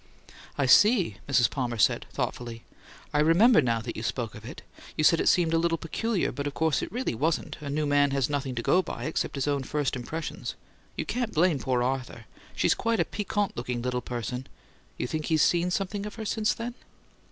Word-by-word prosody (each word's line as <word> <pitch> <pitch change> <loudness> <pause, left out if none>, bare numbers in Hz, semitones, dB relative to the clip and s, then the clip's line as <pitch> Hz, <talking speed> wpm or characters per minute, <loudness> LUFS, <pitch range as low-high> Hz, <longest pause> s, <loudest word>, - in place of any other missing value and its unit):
"I 140 - +2
see," 185 - +5
Mrs. 120 -4 +4
Palmer 120 -1 -3
said, 105 - +2
thoughtfully. 115 -2 -4 0.5
"I 145 - +2
remember 170 +7 +6
now 115 -3 0
that 115 +1 -6
you - - -5
spoke 115 -1 -3
of 105 - -11
it. 120 - -9 0.3
You 155 - +1
said 165 +1 +5
it - - +4
seemed 170 -2 +3
a 165 - +4
little 165 0 +1
peculiar, 205 +5 -1
but 140 +3 -4
of 145 - -5
course 160 -2 +1
it - - -5
really 245 - -2
wasn't: 155 +7 -1
a 145 - -5
'new 150 +2 0
man' 145 0 +3
has 135 -2 +1
nothing 140 -3 -2
to 120 - -3
go 180 - +4
by, 120 -9 -6
except 155 +2 -2
his 140 0 -1
own 140 -1 +1
first 145 0 -1
impressions. 155 +6 -5 0.4
You - - -2
can't 240 -3 -2
blame 165 -2 +3
poor 125 -2 0
Arthur 125 -3 -3 0.3
she's - - +3
quite 230 -1 0
a - - +3
piquant 205 -1 -2
looking 120 0 -3
little 125 0 -1
person. 125 +2 -5 0.5
You - - -2
think 155 +4 -3
he's 160 -1 +3
seen 175 +1 +2
something 200 +2 -2
of 210 - -9
her 220 - -6
since 215 +1 0
then?" 230 +1 -5
145 Hz, 210 wpm, -27 LUFS, 125-175 Hz, 0.5 s, remember